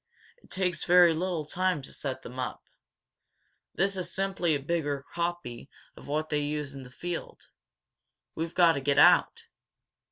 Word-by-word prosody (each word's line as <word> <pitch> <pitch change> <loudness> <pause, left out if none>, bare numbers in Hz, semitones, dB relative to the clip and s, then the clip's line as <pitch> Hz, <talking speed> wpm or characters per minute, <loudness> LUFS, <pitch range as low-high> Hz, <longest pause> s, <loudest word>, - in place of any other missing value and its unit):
It - - -22
takes 180 -2 -1
very 175 -1 +6
little 170 -1 -2
time 180 -2 -1
to - - -10
set 135 -3 -5
them 125 +2 -8
up. 125 - -4 1.1
This 195 +2 +1
is 185 -2 -3
simply 190 -4 0
a - - -1
bigger 145 -2 -2
copy 170 -8 -4 0.3
of - - -13
what 155 +2 -2
they 150 - +1
use 145 -1 -3
in 135 - -8
the 125 - -11
field. 175 +7 -6 0.8
We've 165 +1 -4
got 175 -2 +6
to 140 - -3
get 140 +1 +1
out!" - - +5
160 Hz, 160 wpm, -28 LUFS, 140-175 Hz, 1.1 s, very